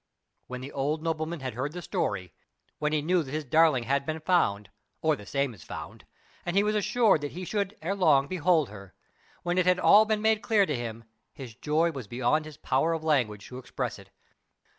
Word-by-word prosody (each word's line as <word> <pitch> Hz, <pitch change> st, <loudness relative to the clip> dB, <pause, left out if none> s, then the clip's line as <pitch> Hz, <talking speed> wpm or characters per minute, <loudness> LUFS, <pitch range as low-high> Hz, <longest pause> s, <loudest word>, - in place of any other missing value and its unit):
When 125 Hz, 0 st, -6 dB
the 135 Hz, +2 st, -7 dB
old 150 Hz, +3 st, -2 dB
nobleman 160 Hz, -1 st, -2 dB
had 130 Hz, -1 st, -4 dB
heard 135 Hz, +6 st, -3 dB
the 180 Hz, -, -6 dB
story, 95 Hz, -, -2 dB, 0.5 s
when 150 Hz, 0 st, 0 dB
he 155 Hz, -1 st, 0 dB
knew 180 Hz, +2 st, +2 dB
that 140 Hz, -, -7 dB
his 155 Hz, 0 st, -3 dB
darling 155 Hz, -2 st, +4 dB
had 140 Hz, +3 st, 0 dB
been 155 Hz, +2 st, -3 dB
found, 105 Hz, -, +1 dB, 0.3 s
or 155 Hz, -1 st, +2 dB
the 105 Hz, -6 st, -12 dB
same 140 Hz, -2 st, -1 dB
as 100 Hz, -, -15 dB
found, -, -, -9 dB, 0.4 s
and 175 Hz, -, -3 dB
he 200 Hz, -, +5 dB
was 210 Hz, 0 st, +1 dB
assured 210 Hz, -4 st, +3 dB
that 145 Hz, -, -5 dB
he 180 Hz, +3 st, -6 dB
should 200 Hz, +1 st, -2 dB
ere 185 Hz, +5 st, 0 dB
long 155 Hz, -8 st, +4 dB
behold 170 Hz, -4 st, +2 dB
her, 100 Hz, -2 st, -12 dB, 0.5 s
when 175 Hz, +1 st, 0 dB
it 180 Hz, -, +2 dB
had 180 Hz, 0 st, +5 dB
all 215 Hz, +1 st, +7 dB
been 215 Hz, -1 st, -1 dB
made 220 Hz, -1 st, +3 dB
clear 215 Hz, -4 st, +3 dB
to 150 Hz, -, -2 dB
him, 115 Hz, -1 st, -5 dB, 0.3 s
his 130 Hz, -5 st, -9 dB
joy 155 Hz, +7 st, +1 dB
was 135 Hz, -8 st, -7 dB
beyond 130 Hz, +7 st, 0 dB
his 155 Hz, -2 st, -10 dB
power 155 Hz, +6 st, +1 dB
of 160 Hz, -1 st, -3 dB
language 120 Hz, -10 st, 0 dB
to 125 Hz, -, -7 dB
express 130 Hz, -, -4 dB
it. -, -, -15 dB
155 Hz, 215 wpm, -28 LUFS, 130-175 Hz, 0.5 s, all